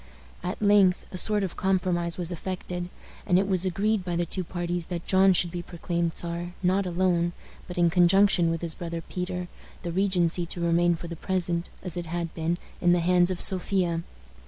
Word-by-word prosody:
At 180 +2 -4
length 200 -3 +4
a 185 - -5
sort 210 0 +3
of 185 - -4
compromise 180 -3 0
was 175 -1 0
effected, 180 0 -5 0.4
and 180 -3 +4
it 195 +1 +2
was 190 -1 +2
agreed 205 +2 0
by 175 -1 -3
the 175 0 0
two 185 +2 -2
parties 175 -1 -3
that 175 -2 -5
John 190 0 +5
should 175 -1 +1
be 175 0 -4
proclaimed 170 -1 -3
Czar, 175 +1 -5
not 185 +1 +2
alone, 175 -1 +1 0.3
but 180 - -8
in 170 -1 +3
conjunction 180 0 +4
with 165 +1 -3
his 165 -1 +1
brother 170 0 -5
Peter, 180 +1 -5 0.4
the 175 - -3
regency 180 -2 +1
to 175 - -5
remain 170 0 +2
for 170 - -8
the 170 - -6
present, 175 -1 -1
as 180 -2 -5
it 175 -1 -4
had 170 0 -4
been, 165 +1 -1 0.2
in 175 -1 +4
the 175 - +2
hands 175 +1 +3
of 185 -2 -3
Sophia. 180 -3 +3
175 Hz, 195 wpm, -26 LUFS, 170-185 Hz, 0.4 s, John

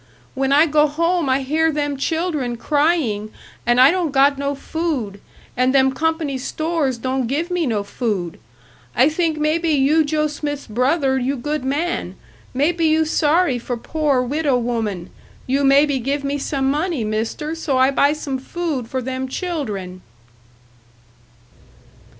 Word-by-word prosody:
When 270 0 -1
I 295 +3 +6
go 300 -1 +3
home 335 +1 0
I 260 +1 +2
hear 320 +4 +1
them 290 -1 -1
children 300 -4 -1
crying 285 -8 0 0.4
and 240 +1 +4
I 260 +2 +8
don't 355 -3 0
got 280 +1 +4
no 280 0 -1
food, 275 - -3 0.3
and 255 +2 +2
them 265 0 +4
company 320 -3 -1
stores 310 -2 -1
don't 255 +1 -2
give 315 +8 -2
me 350 -4 0
no 215 -4 -1
food. 200 -5 -3 0.6
I 260 +4 +5
think 320 0 0
maybe 315 +2 0
you 300 +2 +3
Joe 305 +1 0
Smith's 290 -1 -4
brother 265 +4 +1
you 265 +3 -1
good 295 +3 -3
man, 295 +6 -2 0.4
maybe 325 +6 +1
you 315 0 +3
sorry 305 -3 +2
for 245 +1 -4
poor 285 0 0
widow 285 +1 0
woman, 225 -7 -3 0.3
you 275 +2 0
maybe 280 0 +4
give 280 +4 -2
me 280 +1 -2
some 270 -1 -1
money, 305 -3 -1
Mister, 220 +8 -3
so 320 -5 -1
I 260 +1 +4
buy 280 +1 +3
some 275 -3 -4
food 290 -3 -4
for 260 +1 -3
them 260 +1 -3
children." 220 - -4
280 Hz, 150 wpm, -20 LUFS, 255-310 Hz, 0.6 s, I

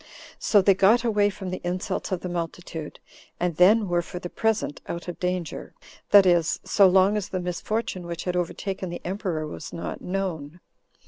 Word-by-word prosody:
So 205 -3 +4
they 195 - +6
got 205 +6 +4
away 210 -3 +3
from 190 -2 -6
the 185 - -5
insults 180 +3 -3
of 185 -2 -1
the - - -4
multitude, 170 -2 -5 0.4
and 175 -2 -1
then 205 +4 +5
were 175 -1 +1
for 175 - -8
the 175 0 -6
present 220 -9 -1
out 170 +1 -5
of 175 - -6
danger, 180 -2 -3 0.3
that 200 -2 +8
is, 175 -3 +3
so 200 -2 +5
long 190 +2 +4
as 205 - -4
the 185 - -2
misfortune 180 +1 -3
which 170 0 -5
had 180 -1 -2
overtaken 185 +2 -3
the 175 - -7
emperor 180 -4 -2
was 150 0 -8
not 165 - -6
known. 180 -4 -4
180 Hz, 185 wpm, -25 LUFS, 175-195 Hz, 0.4 s, that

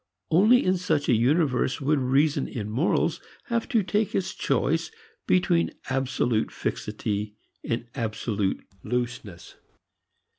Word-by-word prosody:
Only 215 +9 +5
in 185 0 +3
such 150 -5 0
a - - +5
universe 130 +2 +2
would 145 +1 +1
reason 140 +3 +2
in 105 -4 -5
morals 130 +10 +1 0.3
have 235 +1 -1
to 230 -6 +2
take 210 +2 0
its 190 - -1
choice 145 +5 0 0.4
between 175 -2 +2 0.2
absolute 130 -4 0
fixity 105 0 -3 0.3
and 115 +1 -2
absolute 110 -4 -2 0.2
looseness. 120 -5 -4
135 Hz, 115 wpm, -26 LUFS, 115-170 Hz, 0.4 s, Only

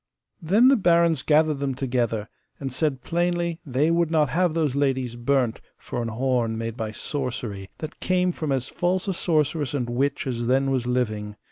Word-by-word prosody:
Then 205 +10 +5
the 275 - +6
barons 170 - +3
gathered 155 0 +3
them 140 -2 -1
together, 120 -5 -1 0.3
and 135 -2 -4
said 140 -3 -1
plainly 175 -1 0
they 145 +3 +1
would 170 -1 +2
not 155 -4 +2
have 170 +4 +1
those 150 -5 +1
ladies 130 -4 0
burnt 120 -1 0 0.2
for 120 - -5
an 115 - -2
horn 120 -1 0
made 115 0 -4
by 110 -2 -4
sorcery, 115 -6 -4
that 155 0 -7
came 180 0 +1
from 155 -4 -3
as 130 -2 0
false 180 +2 -1
a 195 - +1
sorceress 155 -4 0
and 125 -4 -1
witch 140 +4 0
as 120 -3 -2
then 135 +2 +2
was 125 -2 0
living. 110 -4 -1
135 Hz, 180 wpm, -24 LUFS, 120-165 Hz, 0.3 s, the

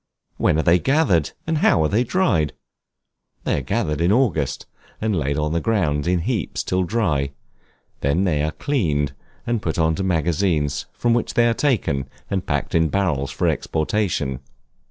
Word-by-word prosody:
When - - +2
are 80 - +1
they 90 +1 +4
gathered, 130 - +2 0.2
and 160 -1 0
how 80 - +4
are - - +3
they 110 +8 +2
dried? 125 - +1 0.9
They - - 0
are - - -5
gathered 75 +4 -1
in 85 +3 +3
August, 85 - +1 0.3
and 110 -2 0
laid 70 -3 -1
on 75 +1 0
the 85 - +1
ground 85 -10 0
in 90 -1 +2
heaps 105 - -2
till 90 0 0
dry; 75 -10 0 0.7
they 70 - -1
are - - +1
then 80 -5 +1
cleaned, 80 - 0 0.3
and 120 -2 -1
put 80 - -2
into 80 +1 +1
magazines, 85 -3 0
from 120 -1 0
which 120 - -1
they 120 0 +4
are 115 - +3
taken 105 - 0 0.2
and 95 -2 -1
packed 70 -2 -1
in 80 -1 +3
barrels 85 -9 0
for - - -1
exportation. 80 -5 -1
85 Hz, 170 wpm, -22 LUFS, 75-110 Hz, 0.9 s, they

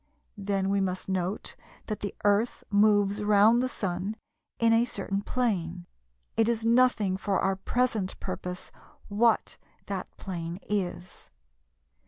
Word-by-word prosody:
Then 195 -1 0
we 200 0 +2
must 185 -1 -2
note 190 +1 -2 0.3
that 215 - -4
the 200 - -4
Earth 205 +4 +2
moves 205 0 +3
round 210 +3 +5
the 255 - 0
Sun 195 -1 -3 0.4
in 230 0 +4
a 230 +1 +5
certain 200 -4 -3
plane 185 -8 -1 0.5
(it 225 0 +3
is 225 -1 -1
nothing 230 -5 +3
for 195 0 0
our 195 0 +1
present 215 -1 -1
purpose 180 -1 -5 0.4
what 220 +2 +2 0.3
that 195 -2 -4
plane 170 -2 -5
is). 185 -3 -3
200 Hz, 130 wpm, -28 LUFS, 190-225 Hz, 0.5 s, round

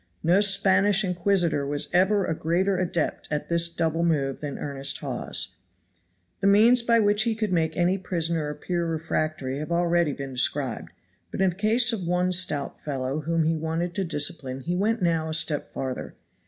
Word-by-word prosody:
No 175 +5 +4
Spanish 200 0 +4
Inquisitor 180 -4 +1
was 145 +1 -2
ever 190 +2 +3
a 160 - -1
greater 175 +5 0
adept 175 -3 -2
at 150 -1 -3
this 170 0 +1
double 165 0 -1
move 140 -5 0
than 145 -2 -5
earnest 140 -1 -2
Hawes. 95 - -3 0.8
The 195 - +1
means 225 +5 +6
by 235 0 +3
which 205 -1 +3
he 225 0 +1
could 215 -3 -2
make 160 -2 0
any 180 +2 +2
prisoner 165 -4 -1
appear 170 +3 -3
refractory 155 -4 -2
have 155 +3 -6
already 170 -2 +2
been 135 -1 -7
described, 130 0 -1 0.4
but - - -7
in 190 -1 +3
the - - -12
case 230 +5 +2
of 190 -6 -4
one 180 +1 +1
stout 170 -6 -1
fellow 135 0 -3
whom 165 +2 0
he 160 +1 +1
wanted 160 +2 -2
to 195 - -1
discipline 145 -5 -2
he 175 +7 -3
now 180 - -1
went 225 +1 0
a 160 -1 -1
step 155 -2 0
farther. 130 -1 -5
170 Hz, 180 wpm, -25 LUFS, 150-190 Hz, 0.8 s, means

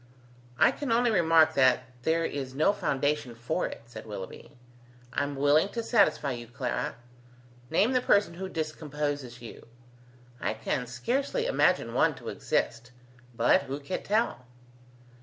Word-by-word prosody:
"I - - +5
can 285 -5 -4
only 240 +1 +3
remark 165 -4 +5
that 130 -3 +4 0.2
there 165 +4 +1
is 135 -3 -4
no 155 +8 +3
foundation 145 - -1
for 125 +10 -2
it," - - -9
said 115 -2 -10
Willoughby. 100 +2 -9 0.6
"I - - 0
am 140 0 -2
willing 145 +6 +3
to 230 - -2
satisfy 155 - +3
you, 120 -1 -6
Clara. 120 +1 -3 0.7
Name 200 - +3
the 255 -1 +2
person 205 -6 +3
who 190 +2 -6
discomposes 145 -6 -4
you. 115 - -11 0.7
I 105 - -2
can 125 +3 -2
scarcely 265 - -1
imagine - - +2
one - - +3
to - - -8
exist: 115 +2 -2 0.5
but 115 +1 +4
who 135 +2 -5
can 145 +6 -4
tell?" 210 - 0
145 Hz, 145 wpm, -28 LUFS, 125-190 Hz, 0.7 s, I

